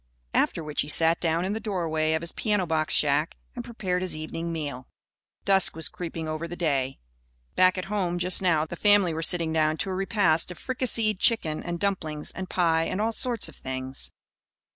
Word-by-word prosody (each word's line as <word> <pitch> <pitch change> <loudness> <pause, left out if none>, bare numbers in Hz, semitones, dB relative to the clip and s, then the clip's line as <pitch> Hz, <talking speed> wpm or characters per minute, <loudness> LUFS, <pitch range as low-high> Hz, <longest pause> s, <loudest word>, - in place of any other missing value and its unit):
After 165 - +1
which 150 -1 -1
he - - -4
sat 165 +2 +3
down 165 +1 +1
in 195 - -1
the 220 - -3
doorway 160 -7 -1
of 160 +1 -1
his 170 - -4
piano 205 -4 0
box 160 -2 -1
shack 150 +2 +2 0.2
and 240 - -5
prepared 190 -7 -3
his 185 -3 -2
evening 165 +2 -5
meal. 145 -6 -5 0.6
Dusk 195 -4 +3
was 160 -1 -1
creeping 165 -2 -6
over 155 +2 -4
the 175 - -7
day. 140 -6 -1 0.6
Back 185 0 +4
at 185 - -3
home, 190 -4 -1
just 180 +1 +5
now, 165 -4 +2
the 165 - -7
family 205 -2 +4
were 160 - -3
sitting 165 -1 +2
down 155 0 +1
to 190 - -3
a - - -2
repast 190 -4 +1
of 180 - -7
fricasseed 230 -4 +2
chicken 160 -11 +1
and 175 -1 -5
dumplings 160 -7 -2
and 190 -1 -7
pie 165 -2 +2
and 185 - -3
all 220 +2 +1
sorts 235 -2 0
of 160 - -11
things. 130 0 -4
170 Hz, 200 wpm, -26 LUFS, 155-190 Hz, 0.6 s, just